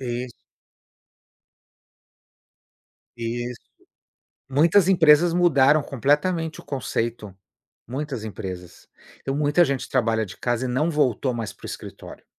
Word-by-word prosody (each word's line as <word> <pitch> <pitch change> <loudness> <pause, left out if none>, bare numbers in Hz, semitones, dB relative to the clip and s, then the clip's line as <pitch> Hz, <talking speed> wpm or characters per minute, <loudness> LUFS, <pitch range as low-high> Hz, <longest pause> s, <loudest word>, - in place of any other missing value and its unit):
iss 125 -1 -4 2.8
Isso. 120 +1 -4 0.9
Muitas 165 +7 +4
empresas 170 -2 +5
mudaram 150 -4 +4
completamente 150 +6 0
o - - -18
conceito, 115 -6 -3 0.5
muitas 130 -2 -5
empresas. 90 -4 -8 0.3
Então 135 - -3
muita 150 +4 +3
gente 140 -4 -2
trabalha 115 -3 +1
de 95 - -11
casa 120 0 -1
e - - -3
não 150 +7 0
voltou 135 -4 +1
mais 110 -3 -4
para - - -21
o - - -7
escritório. - - -9
130 Hz, 110 wpm, -23 LUFS, 115-150 Hz, 2.8 s, empresas